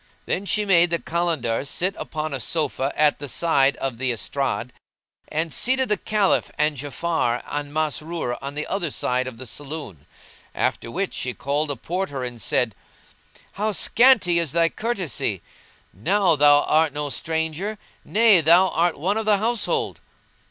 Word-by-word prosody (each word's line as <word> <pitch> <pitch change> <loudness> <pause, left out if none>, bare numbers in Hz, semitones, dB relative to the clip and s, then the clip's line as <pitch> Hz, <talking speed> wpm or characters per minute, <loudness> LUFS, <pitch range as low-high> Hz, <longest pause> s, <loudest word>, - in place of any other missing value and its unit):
Then 195 +2 -2
she 210 +3 +1
made 175 -3 +4
the 170 - +1
Kalandars 155 -8 -1
sit 185 +3 0
upon 155 -1 -4
a 135 - -2
sofa 140 +1 -1
at 150 -1 +3
the 145 -1 -6
side 140 -2 +2
of 130 -4 -4
the 130 -1 +1
estrade, 125 +1 -2 0.5
and 160 +1 -2
seated 260 +1 +1
the 210 - +2
Caliph 210 -3 +1
and 150 0 +1
Ja'afar 145 -2 -1
and 145 0 -4
Masrur 155 -3 -2
on 140 +1 -6
the 150 - -2
other 185 -4 -2
side 125 -1 -1
of 125 -3 -7
the 130 - -9
saloon; 135 - -7 0.5
after - - -1
which 190 +9 -3
she 125 -1 -3
called 140 +4 -1
the 140 - -3
Porter, 170 -7 -3
and 120 -2 -6
said, 115 +2 +1 0.8
"How 210 +1 -2
scanty 225 -6 +4
is 165 -4 -1
thy 165 0 +3
courtesy! 200 - -2 0.5
now 180 - +2
thou 145 0 +5
art 155 -2 +2
no 145 0 -3
stranger; 160 +8 -2 0.3
nay, 215 -5 +5
thou 175 +4 +5
art 170 +1 +1
one 190 +9 0
of 220 - -2
the 210 -1 +5
household." 225 +2 -1
155 Hz, 160 wpm, -23 LUFS, 140-185 Hz, 0.8 s, thou